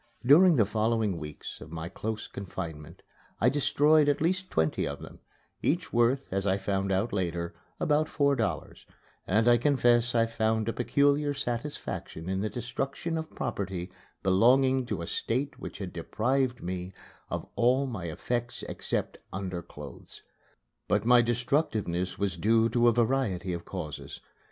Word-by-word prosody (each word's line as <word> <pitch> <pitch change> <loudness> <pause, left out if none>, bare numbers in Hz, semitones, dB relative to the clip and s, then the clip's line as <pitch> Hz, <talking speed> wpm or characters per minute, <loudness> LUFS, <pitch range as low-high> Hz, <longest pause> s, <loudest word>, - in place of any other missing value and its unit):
During 165 +6 +7
the 110 -6 +4
following 110 -3 0
weeks 75 -1 -8
of 80 - -10
my 80 0 -5
close 110 +4 -4
confinement 85 -3 -7 0.4
I 125 - +5
destroyed 145 +2 +4
at 145 - +1
least 185 +3 0
twenty 80 -1 +1
of - - -4
them, - - -11 0.4
each 170 +3 0
worth, 120 +3 +2
as 95 +1 0
I 95 0 +3
found 95 0 -1
out 95 +4 0
later, 85 -3 -2 0.3
about 150 +1 +2
four 140 -2 +2
dollars; 110 -5 -3 0.4
and 110 +5 +3
I 120 0 +7
confess 120 -2 +3
I 115 -1 +4
found 110 -1 0
a 115 - 0
peculiar 145 +3 +2
satisfaction 120 - -4
in 95 0 -1
the 105 - -1
destruction 135 +7 -3
of 160 0 -5
property 95 -7 -3 0.3
belonging 125 +7 +4
to 85 - -3
a - - -3
State 130 +10 -2
which - - -7
had 95 -3 -6
deprived 120 +9 0
me 90 +1 -4 0.4
of - - -3
all 130 +3 +3
my 110 -9 -5
effects 120 +8 -3
except - - -3
underclothes. 95 -2 -7 0.6
But 100 +1 +1
my 120 0 +7
destructiveness 115 - 0
was 100 -3 -1
due 115 +5 +3
to 120 +1 +3
a - - +7
variety 110 -7 0
of 85 -1 -5
causes. 80 -6 -6
115 Hz, 150 wpm, -29 LUFS, 95-130 Hz, 0.6 s, During